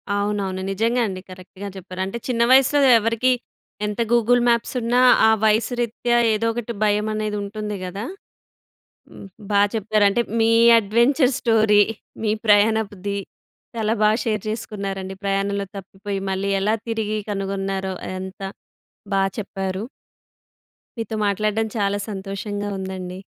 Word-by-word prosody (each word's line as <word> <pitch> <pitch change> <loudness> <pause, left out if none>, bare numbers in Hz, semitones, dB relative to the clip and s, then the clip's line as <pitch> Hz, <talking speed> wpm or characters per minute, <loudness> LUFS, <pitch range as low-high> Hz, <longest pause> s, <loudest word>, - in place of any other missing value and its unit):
అవునవును. 200 -2 -1
నిజంగా 230 +5 +1
అండి. 185 -2 -5
కరెక్ట్‌గా 185 +2 -10
జెప్పారు. 185 0 -7
అంటే 195 +5 -5
చిన్న 240 -2 0
వయసులో 270 +2 +5 0.2
ఎవరికీ 230 +3 +1 0.5
ఎంత 210 +2 -2
గూగుల్ 240 +1 +4
మ్యాప్సున్న 235 0 0 0.3
ఆ - - +6 0.2
వయసు 220 +3 +2
రీత్యా 240 +1 0 0.2
ఏదో 215 +2 -1
ఒకటి 235 0 -4
భయం 210 0 +2
అనేది 215 -1 -2
ఉంటుంది 210 +1 -5
గదా! 195 +4 -5 1.5
బా 200 -1 +4
చెప్పారు. 215 -1 +1
అంటే 235 +4 +1 0.2
మీ 225 0 +4 0.3
అడ్వెంచర్ 240 +6 +3
స్టోరీ, 220 -3 +4 0.4
మీ 215 - +1 0.2
ప్రయాణపుది, 205 -2 +2 0.6
చాలా 220 -1 0
బాగా 215 +1 +4
షేర్ 215 -4 -1
జేసుకున్నారండి. 195 -3 -4
ప్రయాణంలో 200 0 -1
తప్పిపోయి 195 +1 -6
మళ్ళీ 190 +1 -1
ఎలా 210 +3 +2
తిరిగి 215 -1 -1
కనుగొన్నారో 195 -1 -2
అదంతా 190 +1 -6 0.7
బా 195 - +3 0.2
చెప్పారు. 195 -1 -4 1.2
మీతో 225 0 -3
మాట్లాడడం 210 +2 0
చాలా 200 -1 +1
సంతోషంగా 205 +1 -4
ఉందండి. 185 -1 -6
210 Hz, 120 wpm, -22 LUFS, 195-225 Hz, 1.5 s, ఆ